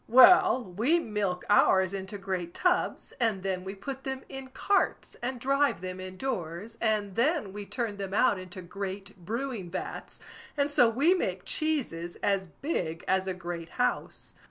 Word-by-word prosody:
"Well, 255 +1 +7
we 225 - +2
milk 210 - -2
ours 190 -2 +4
into 195 +1 -5
great 185 -3 -4
tubs, 360 0 0
and 220 -6 +1
then 190 -1 -1
we 190 +1 -6
put 265 +7 -6
them 265 0 -4
in 270 -1 -7
carts 395 +9 0
and 250 +1 -3
drive 275 -6 +2
them 185 0 -5
in 185 0 -7
doors, 195 -3 -4
and 215 -3 +1
then 255 - +1
we 205 -1 -6
turn 230 -5 -3
them 195 -1 -4
out 205 -1 +3
into 185 0 -8
great 195 +2 -6
brewing 230 -2 -3
vats, 185 - -6 0.4
and 285 0 +1
so 245 -5 +6
we 280 +10 +4
make 190 - -2
cheeses 230 - -1
as 195 -2 +1
big 170 - -3
as 190 0 +2
a 190 - -1
great 170 -2 -6
house. 250 - -1
205 Hz, 165 wpm, -29 LUFS, 185-260 Hz, 0.4 s, Well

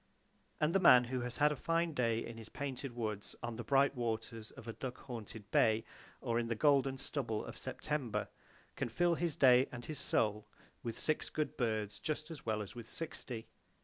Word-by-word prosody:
And 155 +2 +2
the 195 - +5
man 125 -9 +8
who 125 +1 -2
has 125 0 -4
had 150 0 +5
a - - -1
fine 165 +3 0
day 115 -4 +1
in 115 - -7
the 110 -1 -9
painted 135 -2 -4
woods, 110 -4 -3
on 120 -1 -3
the 120 - -5
bright 135 +3 +4
waters 115 -2 -3
of 115 - -12
a 115 - -3
duck 125 +1 -5
haunted 110 -4 -7
bay, 110 0 +4 0.4
or 115 -2 +1
in 115 - -1
the 115 - 0
golden 135 +1 +4
stubble 130 -5 -2
of - - -7
September, 150 -7 -2 0.5
can - - -2
fill 175 +9 +3
his 170 -2 -1
day 130 -1 +6
and 120 -1 -7
his 155 -3 -4
soul 105 -5 +1 0.3
with 115 -1 -4
six 155 - 0
good 155 -1 -2
birds 110 -4 -1
just 155 +1 -3
as 150 -7 -9
well 110 -1 +1
as 100 - -10
with 120 -1 -9
sixty. 125 -8 -4
125 Hz, 200 wpm, -35 LUFS, 115-145 Hz, 0.5 s, man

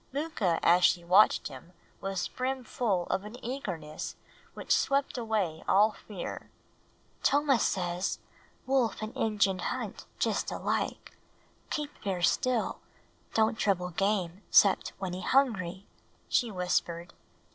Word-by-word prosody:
Mooka 260 - 0
as 175 +1 +5
she 175 0 +4
watched 185 +5 +5
him 145 +6 -12 0.3
was 195 -2 -2
brim 260 0 -3
full 210 -6 0
of 190 - 0
an 210 +3 -8
eagerness 180 - -5 0.4
which - - +1
swept 275 0 +1
away 215 -9 -1
all 210 +3 +5
fear. 200 -4 -7 0.7
"Tomah 285 -3 +3
says, 180 0 0 0.5
wolf 255 -6 +1
and 215 - -6
Injun 205 -4 +1
hunt - - -4
just - - 0
alike; - - -2 0.5
keep 300 -1 -3
ver' 190 -4 -2
still; 250 +4 +1 0.6
don't 220 0 +2
trouble 180 -3 +1
game 195 0 0
'cept 200 -2 +5
when 190 -2 -4
he 185 - -5
hungry," 195 -7 +1 0.4
she 240 - +2
whispered. 180 -2 -1
200 Hz, 125 wpm, -30 LUFS, 180-235 Hz, 0.7 s, as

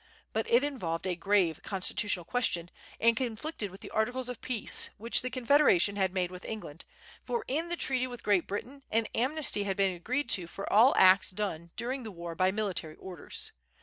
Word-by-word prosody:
But 220 0 -1
it 240 +3 +4
involved 185 - -3
a 185 -2 -1
grave 180 -2 +1
constitutional 195 -1 -1
question, 175 -7 -1 0.3
and 230 0 +4
conflicted 240 -1 -3
with 190 +1 -13
the - - -9
articles 245 +3 -1
of 245 - -7
peace 240 -4 +2
which 230 +3 +1
the 255 - -3
Confederation 240 - +3
had 190 -2 +1
made 180 -1 -1
with 180 0 -9
England; 170 -8 -7 0.4
for 470 -2 -3
in 320 +6 -1
the 345 - 0
treaty 255 -4 +1
with 245 -1 -9
Great 200 -5 +2
Britain 255 +7 -6
an 225 +1 +1
amnesty 265 -2 +3
had 195 -1 -2
been 195 -2 +2
agreed 255 +11 -2
to 180 -3 +1
for 195 +3 -7
all 230 +6 +6
acts 190 +1 +6
done 185 -4 -4
during 255 +3 -3
the 225 - -7
war 170 -3 -7
by 185 +2 +2
military 190 -6 -2
orders. 180 -5 -6
210 Hz, 190 wpm, -30 LUFS, 185-250 Hz, 0.4 s, all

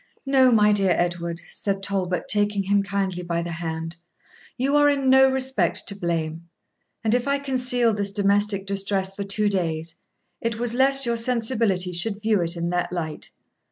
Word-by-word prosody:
'No, 265 -2 +4
my 210 -2 +4
dear 195 -3 +3
Edward,' 170 -1 -2
said 195 -1 -2
Talbot, 185 -3 -1
taking 205 -1 +1
him 200 +1 +2
kindly 195 -2 -2
by 170 -1 -2
the 170 - -5
hand, 165 0 -5 0.6
'you 275 +3 0
are 290 0 +5
in 275 -2 +1
no 265 0 +6
respect 265 0 0
to 200 - 0
blame; 170 -2 -3 0.5
and 220 0 +2
if 245 +2 0
I 280 0 +2
concealed 250 -5 +1
this 200 -1 -2
domestic 200 0 +1
distress 195 -1 -1
for 200 - -4
two 205 +2 0
days, 165 -4 -2 0.5
it 230 -1 -2
was 235 0 -1
lest 270 +2 +4
your 235 0 0
sensibility 225 -6 0
should 200 +4 -1
view 215 -3 +2
it 170 +1 -1
in 170 +1 -2
that 175 0 -1
light. 160 -4 -5
200 Hz, 175 wpm, -23 LUFS, 175-235 Hz, 0.6 s, no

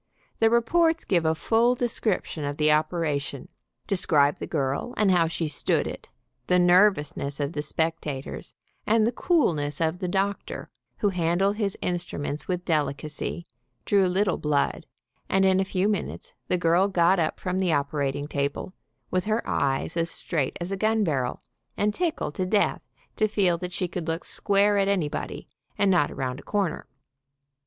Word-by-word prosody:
The 225 - +5
reports 325 +9 +2
give 170 -4 +1
a 160 0 +2
full 230 +8 +2
descrip 235 -4 -1
tion 155 - -6
of 145 0 -3
the 150 0 +3
operation, 150 -3 -1 0.4
describe 150 -7 +2
the - - -5
girl, 140 - -2
and 205 -2 +3
how 170 -2 +4
she 165 0 -2
stood 150 - 0
it, - - -7 0.4
the 180 - +4
nervousness 175 -6 +3
of 145 +2 -2
the 150 - -2
spectators, 155 -3 -4 0.3
and 220 0 +4
the 235 - +2
coolness 160 - +1
of 165 +1 0
the 185 - -2
doctor, 195 +2 -2 0.3
who 205 - +2
handled 180 +3 +1
his 200 -3 -1
instruments 170 -4 -3
with 180 -1 -2
delicacy, 150 +2 -2 0.4
drew 195 -2 +3
little 185 +1 +1
blood, 150 -2 0 0.4
and 195 0 +3
in 190 0 +4
a - - +3
few 190 +1 0
min 210 -2 0
utes - - -10
the 180 - +1
girl 175 +3 +3
got 180 -1 +3
up 160 -2 -1
from 185 0 -2
the 185 -3 +1
operating 145 -1 -1
table 140 +5 -3 0.4
with 185 -1 0
her 220 +2 -1
eyes 135 +3 0
as 165 0 0
straight 155 -5 -2
as 175 +2 -3
a 195 - -1
gun 220 +2 +2
barrel, 135 -8 -1 0.3
and 210 +1 +1
tickled 330 - -2
to 185 +2 -2
death 205 +1 +1 0.3
to 215 - +2
feel 195 -4 +2
that 180 0 -5
she 180 - -1
could 175 -1 -5
look 165 +1 -2
square 205 0 +2
at 195 - +2
anybody, 180 -7 -2 0.3
and 200 -1 +3
not 175 -6 +3
around 130 0 -4
a - - -10
corner. 200 -6 -2
175 Hz, 170 wpm, -26 LUFS, 150-200 Hz, 0.4 s, The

